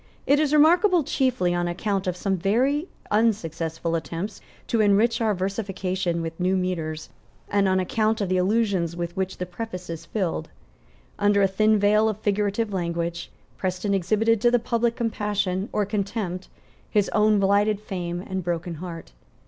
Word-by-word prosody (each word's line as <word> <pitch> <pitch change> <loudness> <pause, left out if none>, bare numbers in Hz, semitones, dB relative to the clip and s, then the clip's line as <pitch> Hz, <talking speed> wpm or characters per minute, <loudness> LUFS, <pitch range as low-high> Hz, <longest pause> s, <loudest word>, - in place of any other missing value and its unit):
It 285 +1 +4
is 305 -2 +1
remarkable 340 +4 +5
chiefly 255 -10 +1
on 175 0 0
account 195 +2 -2
of 180 -1 -1
some 195 +1 0
very 255 - +1 0.2
unsuccessful 165 -7 0
attempts 170 +5 -4 0.2
to 230 - +1
enrich 215 +3 +3
our 215 -2 +2
versification 190 -3 -2
with 165 +1 -6
new 185 +1 +2
metres, 165 -4 -3 0.4
and 200 -1 +2
on 190 0 +2
account 215 +4 0
of 200 - -1
the 185 0 +1
allusions 190 -3 +1
with 175 0 -4
which 190 0 -2
the 180 - -3
preface 180 -1 -6
is 165 0 -7
filled. 180 -6 -2 0.7
Under 205 0 +3
a - - +5
thin 215 +3 +3
veil 210 +2 +3
of 215 - -3
figurative 205 +1 0
language, 170 -1 -2 0.3
Preston 185 +2 -1
exhibited 215 +4 +2
to 240 - +5
the 245 - +4
public 235 0 0
compassion 210 -4 -1
or 210 - 0
contempt 200 -2 -3 0.4
his 205 -2 +2
own 215 -1 +3
blighted 200 +1 +3
fame 175 -4 -4
and 190 -1 -4
broken 175 0 -2
heart. 170 -2 -7
195 Hz, 160 wpm, -24 LUFS, 180-215 Hz, 0.7 s, remarkable